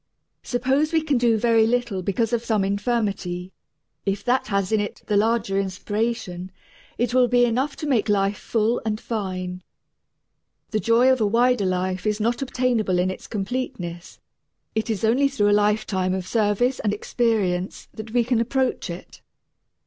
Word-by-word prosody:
Suppose 265 +5 0
we 320 -1 +3
can 290 -5 +1
do 235 -2 +3
very 225 0 +3
little 235 -5 0
because 210 +5 -1
of 235 -1 +1
some 220 -4 +1
infirmity: 200 -4 -2 0.5
if 200 0 -2
that 250 +2 +2
little 205 - -3
has 195 0 -1
in 220 - +3
it 205 - -4
the 210 - 0
larger 205 -2 +2
inspiration, 195 -1 -3 0.5
it 240 +1 0
will 250 -1 +5
be 245 0 +4
enough 260 +5 0
to - - -6
make 245 -8 +1
life 200 0 +1
full 225 +1 0
and 215 -1 -2
fine. 185 -5 -4 1.1
The 215 - +1
joy 235 +4 +4
of 260 -2 +1
a 215 - +3
wider 235 -1 +3
life 185 +2 -1
is 210 0 0
not 235 +3 0
obtainable 250 -7 0
in 180 +1 +1
its - - -9
completeness; 195 -5 -4 0.5
it 220 +1 -2
is 220 -1 0
only 255 +6 +3
through 210 -7 +1
a 205 0 +4
lifetime 205 -3 0
of 185 -1 -4
service 225 +5 +1
and 210 -1 0
experience 205 -6 -1
that 220 0 -8
we 240 +2 +2
can 240 0 +1
approach 250 -2 0
it. 170 +1 -9
220 Hz, 170 wpm, -23 LUFS, 195-245 Hz, 1.1 s, will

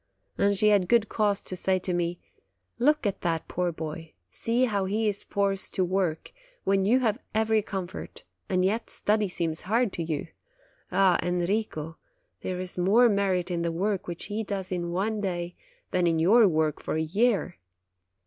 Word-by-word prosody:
And 200 0 +2
she 210 +1 +5
had 200 -4 +3
good 235 -2 +3
cause 205 -2 +1
to 185 - -6
say 185 +1 +1
to 185 0 -2
me: 175 0 -1 0.6
"Look 295 +2 +3
at 200 - -1
that 165 -2 -1
poor 180 -1 -1
boy; 160 0 -7 0.2
see 235 - +1
how 200 -5 0
he 215 +3 0
is 205 -1 -1
forced 195 -1 -1
to 185 - +2
work, 180 -3 -1 0.3
when 195 0 +2
you 245 +6 +4
have 225 -1 +1 0.2
every 220 0 +3
comfort, 190 -2 -6 0.3
and 185 -1 +2
yet 220 +4 -1
study 210 0 +1
seems 165 -3 -2
hard 225 +2 +1
to 175 - -4
you! 160 +2 -3 0.6
Ah, 185 -1 +4
Enrico, 175 -2 -2 0.4
there 185 -1 -4
is 185 -1 -4
more 220 +7 +5
merit 190 -3 +1
in 170 -1 -1
the 170 0 0
work 195 +3 -1
which 170 -1 -5
he 215 +2 -3
does 195 -3 -4
in 175 -1 -2
one 205 +4 -1
day, 175 -3 -3 0.4
than 180 -1 +2
in 165 -1 +2
your 205 +7 +6
work 155 -3 0
for - - -3
a 160 - +1
year. 200 +2 +1
190 Hz, 180 wpm, -27 LUFS, 175-210 Hz, 0.6 s, your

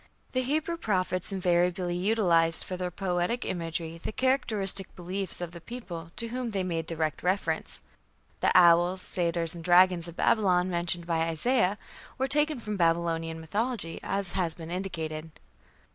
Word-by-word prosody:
The 255 - +1
Hebrew 310 +6 -1
prophets 185 - -1
invariably 180 -1 +1
utilized 175 -4 +2
for 185 - -5
their 180 0 -3
poetic 180 +5 -1
imagery 165 -1 -3
the 180 - -5
characteristic 215 -7 0
beliefs 185 +1 -2
of 175 -1 -4
the 170 0 -10
peoples 175 -9 -7
to 230 -1 -2
whom 250 0 -3
they 195 -3 -1
made 165 -3 -2
direct 160 -2 -2
reference. 185 +3 -1 0.6
The - - +2
"owls", 175 +1 +6
"satyrs", 170 -2 0
and 170 -1 -7
"dragons" 180 0 +5
of 170 - -9
Babylon, 185 -4 +2
mentioned 170 0 -1
by 165 -1 0
Isaiah, 205 +4 +2 0.4
were 265 0 0
taken 295 +1 +1
from 210 -2 -4
Babylonian 165 -1 +1
mythology, 205 +2 -2
as 195 -2 -2
has 175 -4 -1
been 165 0 -8
indicated. 160 -4 -4
180 Hz, 150 wpm, -28 LUFS, 170-205 Hz, 0.6 s, owls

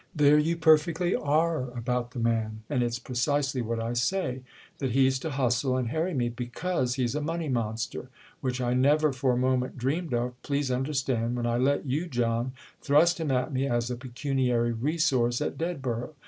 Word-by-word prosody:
There 150 0 +5
you 165 +3 +1
perfectly 160 +2 +3
are 155 -2 +1
about 125 0 -1
the 125 - -7
man, 110 -2 -1
and 130 -4 +1
it's 120 0 0
precisely 130 +2 -1
what 115 0 -2
I 115 +1 -2
say—that 130 -2 -3
he's 130 0 +3
to 160 - -4
hustle 130 -1 +1
and 125 -3 -1
harry 160 +5 -1
me 120 -2 +1
because 125 +3 -2
he's 125 -2 0
a 150 - -1
money 165 +1 -2
monster: 115 0 -3 0.3
which 130 -2 -2
I 125 -1 0
never 145 +3 +3
for 130 -1 +1
a - - 0
moment 130 0 0
dreamed 140 +3 -1
of, 125 +1 -3
please 140 -2 -1
understand, 130 -3 -1
when 120 -1 -2
I 120 0 +1
let 140 +4 +1
you, 145 +6 -1
John, 120 -2 -1 0.3
thrust 160 +4 +4
him 160 -3 -2
at 130 +2 0
me 135 +1 0
as 120 -1 0
a - - -2
pecuniary 125 -1 0
resource 125 -1 +1
at - - -2
Dedborough. 135 -5 -3
130 Hz, 180 wpm, -28 LUFS, 120-150 Hz, 0.3 s, There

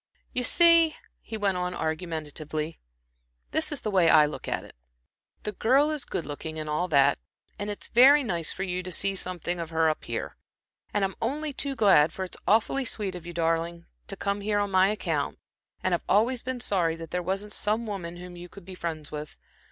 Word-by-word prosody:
"You 250 - 0
see," 335 +3 +6 0.3
he 220 - -6
went 200 -3 0
on, 180 0 -2
argumentatively 155 -1 -4 0.7
"this 315 - +1
is 290 - -2
the 215 - -2
way 180 -4 +4
I 155 -1 +7
look 150 - -6
at - - -2
it. - - -14 0.7
The 210 - -2
girl 270 +9 +3
is 300 -4 -3
good 165 - -4
looking, 155 +2 -6
and 155 0 -4
all 150 +4 0
that, 140 - +4 0.4
and 205 +1 -3
it's 205 - -2
very 275 +5 +6
nice 170 - -1
for 190 - -4
you 180 -1 -2
to 185 0 -7
see 195 +2 +1
something 180 -2 -3
of 165 -1 -4
her 160 -1 +3
up 155 - -7
here, - - -4 0.5
and 205 -2 +1
I'm 190 - -3
only 290 +5 -2
too 275 0 -2
glad, 185 - +5
for 190 - -4
it's 185 - -7
awfully 230 +5 +3
sweet 210 -5 -2
of 175 -2 -8
you, 175 - -6
darling, 165 0 -1 0.2
to - - -3
come 200 0 -2
here 205 0 0
on 205 -1 0
my 185 0 +5
account, 215 - -2 0.5
and - - +1
I've - - +1
always 235 +4 +3
been 255 -1 -4
sorry 175 -7 +1
that 165 -1 -9
there 180 - -1
wasn't 195 +4 -2
some 215 +3 0
woman 185 -5 -5
whom 180 0 -9
you 175 0 -10
could 200 -1 -13
be 190 - -8
friends 160 -4 -5
with. 150 0 -7
185 Hz, 210 wpm, -27 LUFS, 165-215 Hz, 0.7 s, I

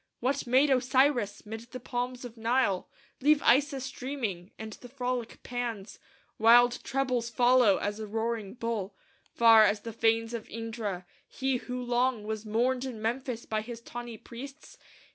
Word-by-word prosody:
What 265 +2 -1
made 265 +4 +4
Osiris, 255 -4 +2
'mid 220 +1 -6
the 255 - -7
palms 250 0 -4
of 240 -1 -9
Nile, 230 -4 +1 0.3
Leave 295 +2 +4
Isis 275 0 +3
dreaming, 225 -10 -4
and 220 0 -7
the 245 - -12
frolic 250 -2 -4
Pan's 235 -5 -5 0.4
Wild 240 +2 +6
trebles 255 -3 -1
follow 240 -3 +4
as 205 +1 -3
a 215 - -5
roaring 225 -1 -3
bull, 230 -5 -3 0.4
Far 225 -2 +8
as 205 0 +2
the 230 0 -7
fanes 225 +1 +1
of 230 -2 -6
Indra; 220 -5 -5 0.2
he 265 -1 -1
who 250 +1 -5
long 245 -1 0
Was 215 0 -5
mourned 245 +4 +1
in 255 -4 -5
Memphis 235 +1 -3
by 215 -1 -1
his 230 +1 -8
tawny 240 -1 -8
priests? 270 +7 -11
235 Hz, 155 wpm, -29 LUFS, 220-255 Hz, 0.4 s, Far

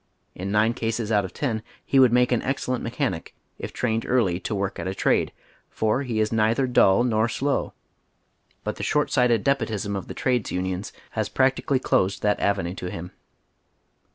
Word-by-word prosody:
In 95 +2 -5
nine 110 +2 +3
cases 115 -1 -2
out 105 -2 +3
of 90 - -7
ten 115 -7 -2 0.2
he 135 - +3
would 130 -3 +7
make 125 +1 +3
an 120 - +2
excellent 130 -2 -2
mechanic, 115 - -3 0.2
if - - -5
trained 115 -2 -1
early 105 -9 +2
to 105 - -3
woi'k 100 -2 -2
at 85 - -3
a 95 - -3
trade, - - +2 0.4
for 110 +4 0
he 120 -5 -2
is 110 0 +1
neither 115 +4 +2
dull 120 -3 +4
nor 115 -2 +2
slow, 135 +3 -1 0.9
but - - -3
the - - -5
short 150 0 +1
sighted 120 -5 +3
despotism 110 -7 0
of 95 - -5
the - - -7
trades 125 -4 0
unions 95 +2 -3 0.2
has - - -2
practicaliy 135 0 +1
closed 95 +1 +1
that 105 -1 +2
avenue 90 -3 0
to 90 -1 -5
him. 90 +1 -7
110 Hz, 180 wpm, -24 LUFS, 100-125 Hz, 0.9 s, would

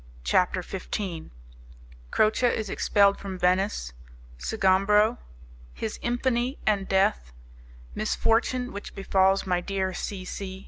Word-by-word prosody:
CHAPTER 180 - +2
XV 185 -2 -5 0.8
Croce 215 - +3
Is 220 -4 -1
Expelled 200 -1 +3
From 195 -2 -6
Venice 180 - 0 0.5
Sgombro 195 - +3 0.6
His 220 - -5
Infamy 245 +2 0
and 200 -2 +1
Death 65 - +1 0.6
Misfortune 245 - 0
Which 200 - -8
Befalls 195 0 +2
My 180 -2 0
Dear 190 0 -2
C. 185 +1 -5
C. 190 0 -6
195 Hz, 105 wpm, -26 LUFS, 185-215 Hz, 0.8 s, Croce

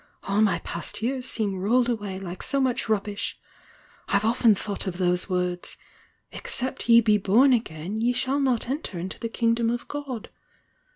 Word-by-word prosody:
All 200 +2 +1
my 215 -2 +3
past 170 +5 -6
years 255 +1 -1
seem 205 -4 0
rolled 235 +6 +2
away 205 -5 -2
like 185 -1 -7
so 275 +2 0
much 255 -3 0
rubbish! 205 -1 -1 0.7
I've 200 +1 +1
often 230 -1 +4
thought 200 +1 -4
of 180 -2 -3
those 180 0 +1
words: 180 -1 -2 0.5
'Except 260 - -4
ye 235 0 +8
be 210 -2 +3
bom 235 +8 +5
again 190 -4 -2
ye 240 +2 +3
shall 260 +3 0
not 255 -5 +1
enter 265 - -4
into 180 +3 -5
the 230 - -3
Kingdom 230 0 +1
of 240 +1 -3
God.' 275 -6 -6
220 Hz, 170 wpm, -25 LUFS, 195-250 Hz, 0.7 s, ye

